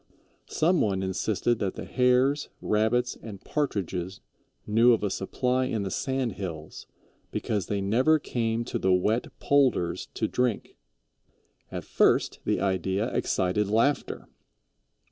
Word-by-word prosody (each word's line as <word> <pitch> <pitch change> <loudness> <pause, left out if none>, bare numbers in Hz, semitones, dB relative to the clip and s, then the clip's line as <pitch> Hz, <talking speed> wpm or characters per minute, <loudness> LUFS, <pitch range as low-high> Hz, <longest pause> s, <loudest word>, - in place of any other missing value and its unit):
Some 170 +1 +2
one 95 -2 0
insisted 105 +4 0
that 95 -2 -2
the - - -6
Hares, 130 +3 +2
Rabbits, 115 +3 +1
and 105 -4 -8
Partridges 95 - -3 0.5
knew 115 +3 +5
of 110 - 0
a 100 - 0
supply 125 +7 0
in 110 -5 -2
the 95 - -4
sand 130 +6 -1
hills, 85 -6 -7 0.4
because 105 -4 -2
they 100 -1 -1
never 125 +11 +3
came 115 -4 -2
to - - -3
the 95 - +2
wet 105 +6 +2
"polders" 130 -12 +2
to - - 0
drink. 125 -4 -1 1.0
At - - -5
first - - +2
the - - +1
idea 95 +2 -1
excited 95 +3 0
laughter. 115 +8 0
110 Hz, 130 wpm, -27 LUFS, 95-125 Hz, 1.0 s, knew